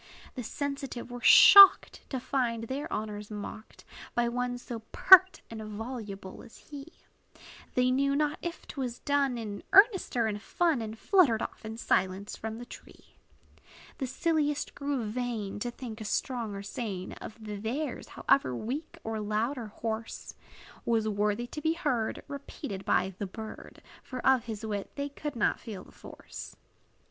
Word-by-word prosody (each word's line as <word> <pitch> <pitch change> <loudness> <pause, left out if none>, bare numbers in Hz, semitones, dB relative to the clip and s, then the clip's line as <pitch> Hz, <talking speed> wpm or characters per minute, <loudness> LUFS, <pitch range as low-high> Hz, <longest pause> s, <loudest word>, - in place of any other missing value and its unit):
The 255 - -5
sensitive 275 -1 -5
were 245 0 -7
shocked, 395 +7 +9
To 260 - -2
find 245 -3 -1
their 265 +5 -4
honors 210 -1 -4
mocked 210 +1 -8 0.3
By 240 0 +2
one 245 +1 -2
so 240 -1 -7
pert 375 0 +7
and 225 -1 -6
voluble 210 -3 -7
as - - -14
he; 285 -1 -10 0.9
They 250 0 +3
knew 275 +2 +2
not 300 +1 0
if 345 -1 -6
't - - -11
was 245 -2 -3
done 280 -3 +1
In 210 -3 -5
earnest 395 - +5
or 230 - +3
in 210 -1 -2
fun; 320 +3 0
And 220 0 -6
fluttered 295 - +3
off - - -7
in 220 +1 -6
silence 190 -2 0
from 220 0 -6
the 240 - -8
tree. - - -14 0.9
The 265 - -2
silliest 295 +1 0
grew 280 -3 -2
vain, 220 -3 -3
To 240 - -2
think 235 -2 -8
a - - -5
song 230 -1 -2
or 200 - -6
strain 200 -3 -5
Of - - -8
theirs, 220 +7 -4
however 130 - +1
weak, 265 - -5
or 220 -1 -3
loud, 215 +5 -1
or 230 - -6
hoarse, 220 +1 -5 0.5
Was 225 -2 +1
worthy 210 +2 0
to 300 +5 -7
be 320 +1 +2
heard 255 -10 -1
Repeated 280 -7 -7
by 190 +1 +1
the 200 - -3
bird; 220 +3 -10 0.2
For 255 - -7
of 260 -3 +4
his 220 -1 -5
wit 205 -2 -3
they 280 0 -3
could 290 0 -6
not 220 - +1
feel 210 -6 -8
the - - -17
force. - - -10
235 Hz, 165 wpm, -29 LUFS, 215-275 Hz, 0.9 s, shocked